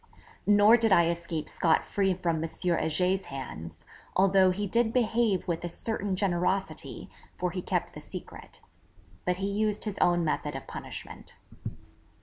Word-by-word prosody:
Nor 205 +3 +7
did 225 -2 +1
I 170 -3 +5
escape 170 -2 -3
scot 165 -2 +2
free 195 -2 0
from 170 -2 -1
M. - - -3
Heger's 180 +2 0
hands, 85 - -8 0.3
although 190 0 +5
he 200 +3 -1
did 225 +3 +1
behave 230 -5 +1
with 170 -1 -2
a 175 - -2
certain 200 +1 -2
generosity, 190 0 -1 0.3
for 180 -1 -1
he 180 +1 -3
kept - - -2
the - - -9
secret. - - -10 0.6
But 180 0 +1
he 195 +1 -2
used 210 0 0
his 210 -3 -3
own 175 -1 +3
method 150 -2 -1
of 135 - -6
punishment. - - -9
185 Hz, 150 wpm, -28 LUFS, 170-205 Hz, 0.6 s, Nor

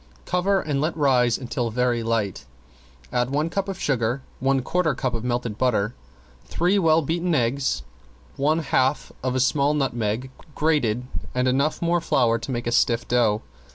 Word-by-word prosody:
Cover 190 +2 +1
and 145 -5 -1
let 160 +2 -1
rise 125 -5 +3
until 125 -2 -3
very 120 +1 0
light; 115 -4 -1 0.7
add 125 0 +1
one 150 +4 0
cup 195 +2 -1
of 190 -2 -5
sugar, 125 -1 0 0.2
one 135 0 +1
quarter 165 -1 +1
cup 125 0 -2
of 115 -1 -3
melted 120 -3 -2
butter, 115 -3 +1 0.5
three 180 +4 +1
well 165 -2 +4
beaten 170 +3 0
eggs, 120 - 0 0.5
one 155 +4 +1
half 135 0 +1
of 130 0 -1
a - - +1
small 140 +3 +2
nutmeg 125 -3 -1 0.2
grated 125 -7 +1 0.3
and 125 0 +1
enough 140 +6 +1
more 170 0 +2
flour 115 -6 +2
to 115 - -8
make 120 -1 -3
a 120 - -1
stiff 120 0 +2
dough. 115 -4 +2
130 Hz, 165 wpm, -24 LUFS, 120-155 Hz, 0.7 s, well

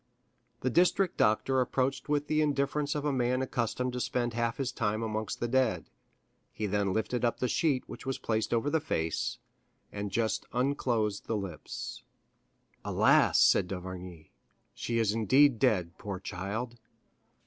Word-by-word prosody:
The 130 - 0
district 180 +4 +3
doctor 130 +5 +3
approached 130 +3 -1
with 145 -1 +1
the 155 +1 +1
indifference 145 0 0
of 150 0 -2
a 145 - +1
man 125 0 +1
accustomed 125 0 -2
to 125 - -3
spend 120 -1 -1
half 115 0 -1
his 135 -2 -1
time 110 -1 -1
amongst 110 -1 -3
the 120 - -1
dead; 130 -1 +1 0.6
he 110 - -4
then 100 -1 0
lifted 110 +4 -1
the 120 +1 0
sheet 140 -1 +1
which - - -9
was 135 0 -2
placed 110 -1 -1
over 120 +5 +1
the 160 - +3
face, 80 - -2 0.5
and 105 0 -4
just 110 +3 -1
unclosed 120 -5 0
the 110 - 0
lips. 95 -3 -6 0.8
"Alas," - - +4
said - - +5
d'Avrigny, 90 -3 -7 0.4
"she 115 - -2
is 110 -3 +2
indeed 120 +4 +4
dead, 90 -10 +1
poor 100 -3 -5
child!" 105 +6 -5
120 Hz, 150 wpm, -30 LUFS, 105-130 Hz, 0.8 s, said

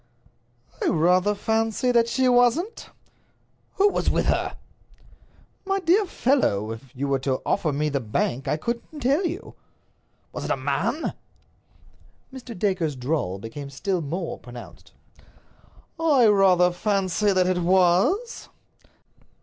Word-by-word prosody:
"I - - +1
rather 180 +5 +2
fancy 225 +3 0
that 235 -1 +3
she 260 +2 +1
wasn't." 250 - +2 0.9
"Who 400 +1 +4
was - - -1
with - - 0
her?" - - -1 1.1
"My 390 0 -1
dear 375 +3 +2
fellow, 115 - +1
if 115 +4 -9
you 140 +2 -2
were 135 -1 +1
to 130 0 -1
offer 155 - 0
me 150 +2 -1
the 140 -2 -1
bank 120 +2 -2
I - - 0
couldn't 235 - -5
tell 275 +8 +2
you." 350 +4 -7 0.8
"Was - - -5
it - - -4
a - - +1
man?" - - -2 1.2
Mr. 255 -4 -9
Dacre's 180 -6 0
drawl 125 - -2
became 115 +7 -8
still 180 +6 -2
more 165 +4 -4
pronounced. 120 -1 -12 1.1
"I 295 -7 +4
rather 190 -4 +4
fancy 195 +1 0
that 185 -1 +2
it 180 -1 +1
was." 185 - +2
190 Hz, 130 wpm, -24 LUFS, 150-245 Hz, 1.2 s, Who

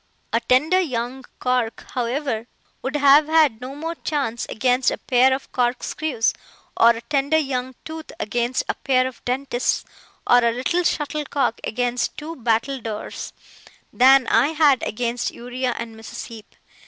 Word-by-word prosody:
A - - +4
tender 310 +9 +3
young 255 -4 -3
cork, 250 -3 -1
however, 245 -1 -2 0.3
would 265 +3 -3
have 290 +1 +6
had 310 -8 +3
no 260 +2 -7
more 325 +3 -4
chance 280 -8 -3
against 250 +2 +2
a - - -3
pair 255 +1 +3
of 265 +1 -3
corkscrews, 245 +1 0 0.4
or 230 - +6
a 230 0 +1
tender 280 +4 +1
young 260 -4 -2
tooth 320 0 -8
against 240 +4 -1
a - - 0
pair 255 -2 +1
of 260 -1 -7
dentists, 255 0 -1 0.4
or 245 0 +5
a 235 - +3
little 260 +9 0
shuttlecock 290 -6 -1
against 245 +1 -1
two 315 +2 -6
battledores, 230 -2 -2 0.6
than 265 +1 +6
I 230 +4 +4
had 295 -5 +4
against 240 +2 -2
Uriah 245 +1 -3
and 230 -1 -6
Mrs. 220 0 -8
Heep. 225 -2 -12
255 Hz, 145 wpm, -22 LUFS, 240-285 Hz, 0.6 s, have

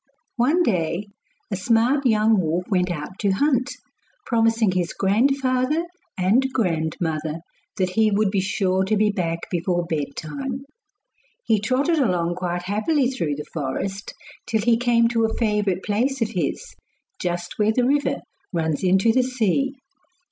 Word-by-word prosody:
One 295 +9 +3
day 180 - -1 0.4
a - - 0
smart 240 +7 +2
young 220 -1 +3
wolf 170 +2 -1
went 180 -1 +2
out 175 +3 -5
to 205 - +1
hunt, 260 +3 +1 0.6
promising 225 -3 +2
his 180 -2 -1
grandfather 255 - +1 0.3
and 225 +9 +2
grandmother 160 -6 -1 0.4
that 185 -2 0
he 220 +2 +3
would 205 -1 +1
be 195 -2 +1
sure 190 -1 0
to 215 +3 +1
be 210 0 +3
back 170 -4 -2
before 175 0 0
bedtime. 170 - -4 0.8
He 220 -2 +3
trotted 275 +9 +1
along 175 -9 +1
quite 175 -1 -2
happily 245 - +1
through 165 - -2
the 150 +1 -6
forest 175 +7 -4 0.3
till 220 -2 +1
he 230 +2 +4
came 235 -1 +3
to 230 -1 +2
a 220 - -2
favourite 210 -5 0
place 245 +6 0
of 225 -2 0
his, 165 -6 -3 0.5
just 175 +1 -4
where 210 +1 +3
the 245 +2 +1
river 285 +2 +1 0.3
runs 160 -3 -1
into 190 +4 +4
the 255 +3 +3
sea. 255 +2 0
210 Hz, 150 wpm, -23 LUFS, 180-245 Hz, 0.8 s, he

